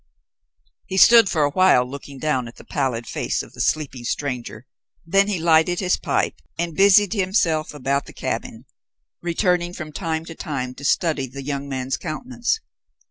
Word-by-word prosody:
He 190 - -3
stood 230 0 +8
for 155 -3 +1
a 145 - +1
while 165 -7 +4
looking 140 +1 -9
down 130 -4 -1
at 115 - -12
the - - -14
pallid 130 -5 -2
face - - -2
of - - -15
the - - -5
sleeping 140 -5 -1
stranger, 125 -3 -4 0.4
then 195 +4 +3
he 205 -3 -1
lighted 165 +1 +3
his 180 -2 +2
pipe - - -1 0.2
and 170 -1 -2
busied 200 +2 +5
himself 185 -6 +1
about 140 -1 -2
the - - -10
cabin, 120 -1 -4 0.6
returning 175 0 0
from 155 -3 -7
time 160 0 -3
to 165 - -8
time 130 -6 -4
to 135 - -12
study 145 -2 +1
the 135 +2 -8
young 140 0 -4
man's 130 -1 -2
countenance. 240 - -3
155 Hz, 170 wpm, -22 LUFS, 135-180 Hz, 0.6 s, stood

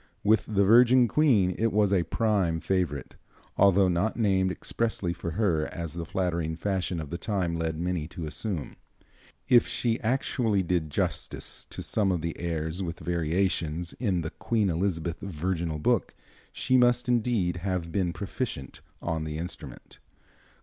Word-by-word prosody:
With 110 +1 +3
the 100 -2 +2
Virgin 120 +4 +6
Queen 115 -11 +3
it 115 0 +2
was 105 -1 +3
a 95 - +4
prime 90 -2 +1
favorite, 85 -7 -2 0.4
although 100 -1 +5
not 90 +6 0
named 95 -4 +2
expressly 100 -3 -2
for 85 -2 -5
her 85 -8 +2
as 85 -2 -5
the 85 -1 -5
flattering 85 -4 -1
fashion 95 0 -2
of 75 -1 -6
the 85 - -4
time 95 -6 -1
led 80 -1 -2
many 85 -2 -2
to 85 -1 -6
assume. 85 +1 -4 0.7
If 120 -2 +5
she 115 -1 0
actually 115 -4 +1
did 85 -3 0
justice - - -3
to - - -7
some 100 -3 +1
of 90 -3 -1
the 85 +1 -3
airs 80 +1 -2
with 85 -2 -4
variations 85 0 -1
in 95 -8 +1
the 80 - -4
"Queen 110 -5 0
Elizabeth 85 -1 -1
Virginal 85 -3 -2
Book," 75 - +1 0.4
she 130 - +1
must 125 0 +4
indeed 115 -7 +1
have 90 -2 -2
been 90 -1 0
proficient 95 - -5 0.2
on 80 -2 -1
the 75 -1 -4
instrument. 85 +2 -7
90 Hz, 155 wpm, -27 LUFS, 85-105 Hz, 0.7 s, Virgin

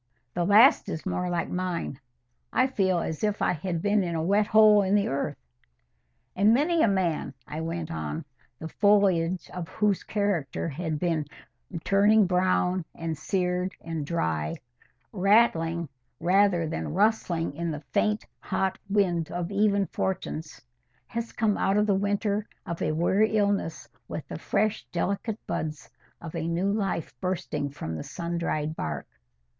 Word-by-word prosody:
"The 175 - 0
last 225 +9 +6
is 160 - -5
more 180 -1 -1
like 175 -1 -1
mine. 180 -6 -3 0.5
I 255 - +3
feel 195 -8 +1
as 160 0 -3
if 210 -1 +1
I - - +2
had 170 0 -3
been 205 0 +3
in 170 -2 -2
a 160 - -1
wet 200 +4 +2
hole 215 -1 +7
in 195 +1 +2
the 205 -1 +2
earth." 140 +2 -2 1.0
"And 210 +4 +5
many 320 +5 +2
a - - +5
man," 180 -8 0
I 155 +2 -5
went 165 0 -4
on, 165 -1 -4 0.3
"the 160 - -6
foliage 185 -2 +2
of 180 -2 -5
whose 210 -3 +1
character 200 -9 -1
had 160 +1 -3
been 160 -3 -1 0.6
turning 205 +2 +5
brown 180 0 +1
and 165 -1 -3
seared 180 +3 -1
and 165 -2 -4
dry, 80 - -1 0.6
rattling 180 -5 +3 0.3
rather 180 0 +3
than 155 0 -4
rustling 185 -7 +1
in 170 +2 -2
the 150 -2 -4
faint 210 0 +1
hot 190 -1 -1
wind 180 -5 +1
of 175 +1 -3
even 200 0 +2
fortunes, 175 -5 -4 0.5
has 230 0 -4
come 215 -2 0
out 195 +1 +2
of 210 - +3
the 205 - +2
winter 205 +1 0 0.2
of 170 -1 -5
a - - +1
weary 195 +7 +2
illness 200 -5 0 0.2
with - - -6
the - - -5
fresh 215 +1 0
delicate 200 +5 -1
buds 155 -2 -4 0.3
of 165 -2 -8
a 165 -1 -2
new 175 +4 0
life 195 -6 -2
bursting 175 -6 -2
from 110 - -6
the 80 - -5
sun 170 0 -4
dried 155 -2 -1
bark." 75 - -4
180 Hz, 155 wpm, -27 LUFS, 165-205 Hz, 1.0 s, hole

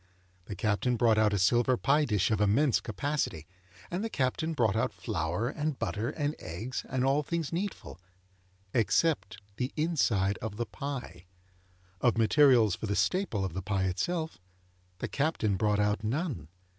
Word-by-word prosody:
The 100 - -6
Captain 105 +6 0
brought 115 -2 +4
out 110 -1 +4
a 100 - +1
silver 120 +7 +3
pie 145 +4 +3
dish 105 -4 +1
of 105 -1 +1
immense 115 +6 +3
capacity, 110 - -2 0.5
and 180 +4 -2
the 225 - -2
Captain 155 +2 -1
brought 115 -8 +2
out 115 - +1
flour 85 +8 -2
and 150 +1 -2
butter 110 +3 -2
and 145 -1 -2
eggs 110 +10 -5
and 130 0 0
all 140 +2 +3
things 165 +1 -3
needful, 170 - -4 0.7
except 115 - +1 0.2
the 125 +1 -2
inside 115 - +1
of 110 -2 -5
the 120 - -1
pie; 125 - -6 0.7
of 120 -2 +3
materials 115 -2 +5
for 110 - -4
the 100 - 0
staple 175 - 0
of 95 - -4
the 95 - -3
pie 95 0 -1
itself, 160 - -2 0.6
the - - -3
Captain 140 -9 0
brought 105 +1 +1
out 105 +1 +1
none. 120 - -2
115 Hz, 160 wpm, -30 LUFS, 100-145 Hz, 0.7 s, materials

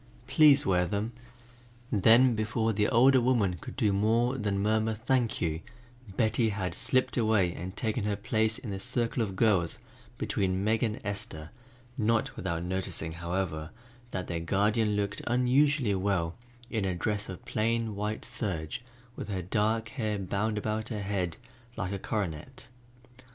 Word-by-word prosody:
Please 140 +2 +6
wear 90 -1 +3
them." 105 +5 -2 0.8
Then 115 +5 +6
before 110 +1 0
the 105 0 +2
older 130 +2 +6
woman 115 -8 +2
could - - -8
do 105 -6 +2
more 115 +5 +2
than 105 -6 -1
murmur 110 +2 +1
"Thank 120 +1 0
you," 80 -2 0 0.6
Betty 110 0 +3
had 100 -3 -2
slipped 130 0 0
away 110 -6 +3
and 90 +5 -7
taken 110 -1 -1
her 105 -1 0
place 110 +2 0
in 110 - -6
the 95 - -4
circle 120 +1 -1
of 100 -4 -2
girls 95 -5 +2 0.4
between 95 -1 0
Meg 110 +1 +2
and 110 -3 0
Esther, 100 -6 -5 0.5
not 115 0 +1
without 85 -2 -3
noticing, 90 -3 -2
however, 85 -2 -3 0.4
that 95 -5 -3
their 85 - -3
guardian 105 +5 +1
looked 100 0 -2
unusually 125 0 +3
well 95 -4 0 0.4
in 110 -3 0
a 95 -2 0
dress 105 +3 -2
of 95 - -8
plain 115 0 0
white 105 +2 -3
serge 80 -3 -3 0.3
with - - -6
her 95 -3 -2
dark 110 +4 0
hair 110 -4 -2
bound 100 +3 -1
about 110 +1 -2
her 105 -3 -3
head 95 -4 -2 0.4
like 90 0 -2
a 100 - -3
coronet. 105 - -4
105 Hz, 155 wpm, -29 LUFS, 95-115 Hz, 0.8 s, Please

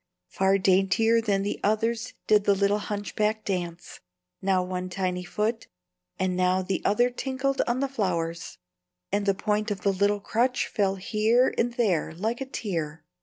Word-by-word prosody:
Far 195 +1 +2
daintier 195 +4 +3
than 200 -3 0
the 205 - -3
others 225 +3 0
did 210 -1 +4
the 200 - +4
little 200 +1 +2
hunchback 210 +1 -2
dance; 175 -2 -4 0.4
now 190 -1 +2
one 180 0 -4
tiny 180 -1 -2
foot 215 +5 -2 0.5
and 185 -1 0
now 185 +1 +2
the 185 -1 -2
other 240 +4 +3
tinkled 265 +2 -1
on 245 +2 0
the 275 - +1
flowers, 170 - -2 0.5
and 205 0 0
the 195 - +3
point 210 +2 -1
of 200 -3 -3
the 200 - +2
little 200 +2 +2
crutch 245 +5 0
fell 195 -2 0
here 220 +6 +2
and 240 +1 0
there 190 -9 0
like 225 +8 -2
a 270 - -3
tear. 165 - -4
200 Hz, 165 wpm, -26 LUFS, 185-225 Hz, 0.5 s, did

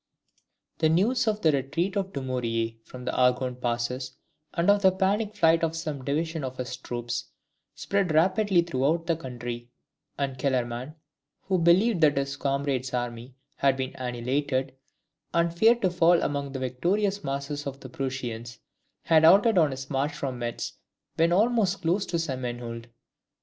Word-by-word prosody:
] - - -55
The 160 - +3
news 225 +9 +2
of 215 -1 0
the 160 - +5
retreat 150 +8 -1
of 195 -1 -1
Dumouriez 115 -5 -2
from 125 -1 -10
the 125 - -2
Argonne 125 0 +2
passes, 125 +2 -3 0.3
and 170 +2 -1
of 205 0 +2
the 190 -1 +6
panic 200 +3 0
flight 165 -4 +4
of 165 0 0
some 155 -5 -4
divisions 160 +3 -2
of 130 0 -5
his 125 0 -4
troops, 120 -1 -4 0.5
spread 200 -4 0
rapidly 185 +3 +3
throughout 160 +1 0
the 165 -1 +1
country; 120 -4 -6 0.5
and 135 -2 -2
Kellerman, 125 +1 -1 0.5
who 190 -1 0
believed 175 +4 +4
that 145 -3 +4
his 140 0 -1
comrade's 135 -2 -1
army 120 +1 -4 0.2
had 135 -1 +2
been 130 0 -3
annihilated, 130 +2 -2 0.6
and 170 0 +2
feared 230 +6 +4
to 185 - +3
fall 175 0 +4
among 140 -1 -2
the - - -3
victorious 185 - 0
masses 140 +1 -3
of 135 0 -6
the - - -8
Prussians, 120 -3 -5 0.5
had 160 -1 +4
halted 195 +5 +6
on 155 -3 +4
his 135 0 -7
march 140 +2 0
from 130 -3 -4
Metz 120 -1 -4 0.4
when 165 +1 +3
almost 205 0 +2
close 180 +5 +1
to 170 - -1
St. 140 -6 -3
Menehould. 120 -1 -5
140 Hz, 160 wpm, -27 LUFS, 125-170 Hz, 0.6 s, the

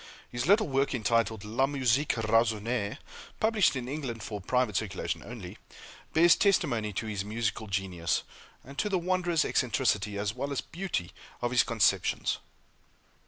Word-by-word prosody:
His 120 +3 -2
little 210 +2 +5
work, 135 -1 +1
entitled 110 -2 +1
"La 120 +6 +1
Musique 135 0 +1
Raisonnée," 115 -1 +1 0.4
published 220 -7 +3
in 125 -2 -4
England, 130 -6 -4
for 105 -2 -5
private 125 +1 +1
circulation 95 -1 -2
only, 110 -7 -9 0.5
bears 170 +1 +6
testimony 120 - +2
to 110 - -3
his 105 -3 -3
musical 110 +1 -2
genius, 95 -4 -1 0.4
and 140 +2 -9
to 210 - +1
the 190 - +2
wondrous 175 -2 +1
eccentricity, 105 -4 +1
as 100 +1 -1
well 140 +3 -4
as 140 - -1
beauty, 170 - -4 0.3
of 120 0 -1
his 125 - +5
conceptions. 115 -4 +1
120 Hz, 145 wpm, -29 LUFS, 105-140 Hz, 0.5 s, bears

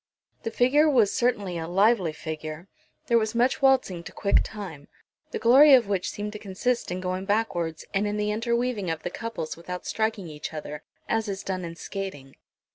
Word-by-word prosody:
The - - -3
figure 275 +7 +4
was 235 -8 +4
certainly 205 -8 0
a 160 - -4
lively 195 -1 +3
figure. 155 +2 -6 0.4
There 235 -1 +4
was 220 0 -2
much 245 +4 +2
waltzing 260 -10 +3
to - - -8
quick 200 - +2
time, 180 -10 -8 0.4
the - - -3
glory 270 +4 +8
of 240 -5 +3
which 195 -3 -1
seemed 210 0 -5
to 210 - -7
consist 220 +5 -1
in 180 +1 -3
going 185 +1 -3
backwards, 195 -6 -1
and 200 +1 +1
in 205 0 -2
the 210 0 0
interweaving 235 -2 -1
of 160 -1 -3
the 175 - -3
couples 230 -9 -5
without 180 +2 -7
striking 220 -4 -1
each 155 0 -7
other, 150 0 -6 0.3
as 225 -1 0
is 195 0 -4
done 185 -1 -3
in 170 -1 -6
skating. 170 -8 -6
200 Hz, 190 wpm, -26 LUFS, 175-230 Hz, 0.4 s, glory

